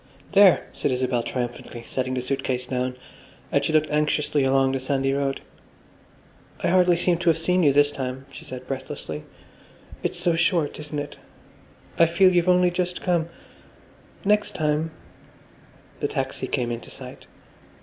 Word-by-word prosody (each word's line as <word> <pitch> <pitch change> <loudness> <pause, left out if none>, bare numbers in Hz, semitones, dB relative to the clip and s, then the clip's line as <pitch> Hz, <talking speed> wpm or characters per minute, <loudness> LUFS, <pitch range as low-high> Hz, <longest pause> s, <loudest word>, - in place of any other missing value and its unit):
"There," 200 -2 +6
said - - -1
Isabel 125 -2 0
triumphantly, 120 -1 -5
setting 130 0 -2
the 125 - -2
suit 135 +1 -2
case 125 -1 -1
down, 125 0 -2 0.6
and - - +2
she - - 0
looked 155 0 +2
anxiously 150 -1 +1
along 135 0 +3
the 135 - -1
sandy 135 +1 0
road. 140 -1 -1 1.2
"I - - +2
hardly 180 -1 +4
seem 175 0 +1
to 170 -1 +2
have 165 - +3
seen 180 +3 +2
you 145 -4 +5
this 145 +1 +4
time," 130 -1 -5
she - - -10
said 130 -4 -8
breathlessly. 80 - -6 0.8
"It's 175 - -3
so 175 -2 +2
short, 165 -3 +1
isn't 150 0 -6
it? 145 0 -5 0.8
I 165 - +7
feel 185 +3 +4
you've 175 0 +3
only 180 0 +4
just 180 0 -2
come. 170 -3 0 1.0
Next 210 +1 +2
time—" 155 0 0 1.1
The - - 0
taxi - - -3
came 120 -1 -1
into 120 0 -6
sight. - - -10
150 Hz, 160 wpm, -24 LUFS, 130-175 Hz, 1.2 s, I